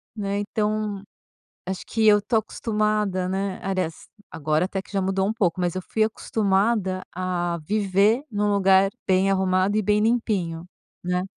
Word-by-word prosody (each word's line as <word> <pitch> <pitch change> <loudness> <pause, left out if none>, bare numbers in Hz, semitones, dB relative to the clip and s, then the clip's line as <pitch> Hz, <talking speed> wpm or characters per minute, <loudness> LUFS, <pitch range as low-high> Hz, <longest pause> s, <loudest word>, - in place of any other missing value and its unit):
né. 200 -1 -2
Então, 210 -1 -2 0.6
acho 190 0 -4
que 225 -1 0
eu 210 -1 +6
tô 230 - 0
acostumada, 210 -4 0
né. 195 0 -2
Aliás, 185 -4 -3 0.2
agora 155 +2 0
até 195 0 -3
que 195 - -15
já 195 - +1
mudou 190 +1 0
um 215 - 0
pouco, 185 -5 0
mas 175 -1 0
eu 185 - -3
fui 220 +4 0
acostumada 200 -2 0
a 175 -1 -2
viver 205 - +2
num 205 -1 0
lugar 195 -1 +4 0.2
bem 190 0 +3
arrumado 190 +1 +1
e 215 - +2
bem 210 +1 +2
limpinho, 205 -8 0 0.4
né. 180 0 0
195 Hz, 160 wpm, -24 LUFS, 185-210 Hz, 0.6 s, eu